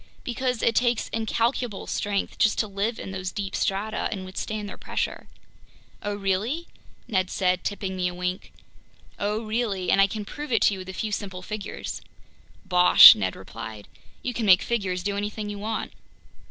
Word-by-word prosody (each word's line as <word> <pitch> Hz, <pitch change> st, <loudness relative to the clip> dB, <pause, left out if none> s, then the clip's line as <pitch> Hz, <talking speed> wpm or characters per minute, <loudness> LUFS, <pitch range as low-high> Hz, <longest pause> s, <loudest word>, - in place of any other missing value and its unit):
"Because 250 Hz, -1 st, -2 dB
it 230 Hz, -, +3 dB
takes 240 Hz, 0 st, +1 dB
incalculable 225 Hz, 0 st, -1 dB
strength 200 Hz, -1 st, -2 dB
just 215 Hz, -, +3 dB
to 215 Hz, -, +1 dB
live 205 Hz, +3 st, -2 dB
in 190 Hz, -, -7 dB
those 185 Hz, -1 st, -4 dB
deep 195 Hz, -4 st, -4 dB
strata 205 Hz, +3 st, -1 dB
and 190 Hz, -2 st, -4 dB
withstand 205 Hz, +3 st, -4 dB
their -, -, -7 dB
pressure." -, -, -4 dB, 0.7 s
"Oh 205 Hz, 0 st, -2 dB
really?" 205 Hz, -, -1 dB, 0.4 s
Ned 185 Hz, -3 st, 0 dB
said, 185 Hz, -1 st, +1 dB
tipping 195 Hz, -2 st, -3 dB
me 180 Hz, -1 st, 0 dB
a 180 Hz, -, -4 dB
wink. 180 Hz, +1 st, -3 dB, 0.7 s
"Oh 210 Hz, +2 st, -1 dB
really, 215 Hz, -4 st, -1 dB
and 195 Hz, -, +5 dB
I 195 Hz, -, +6 dB
can 210 Hz, +1 st, -5 dB
prove 295 Hz, +5 st, -7 dB
it 225 Hz, -4 st, +3 dB
to -, -, +5 dB
you 190 Hz, -, -5 dB
with 185 Hz, 0 st, -8 dB
a -, -, -5 dB
few 215 Hz, +3 st, -3 dB
simple 190 Hz, -3 st, -4 dB
figures." 210 Hz, 0 st, -5 dB, 0.6 s
"Bosh!" 180 Hz, -1 st, +10 dB
Ned 95 Hz, -3 st, -2 dB
replied. 110 Hz, +1 st, -9 dB, 0.4 s
"You 250 Hz, -, -2 dB
can 225 Hz, -2 st, -2 dB
make 185 Hz, -1 st, +7 dB
figures 190 Hz, -6 st, -1 dB
do 200 Hz, +1 st, -1 dB
anything 210 Hz, 0 st, -3 dB
you 205 Hz, -, -6 dB
want!" 220 Hz, +2 st, -3 dB
205 Hz, 180 wpm, -25 LUFS, 185-220 Hz, 0.7 s, Bosh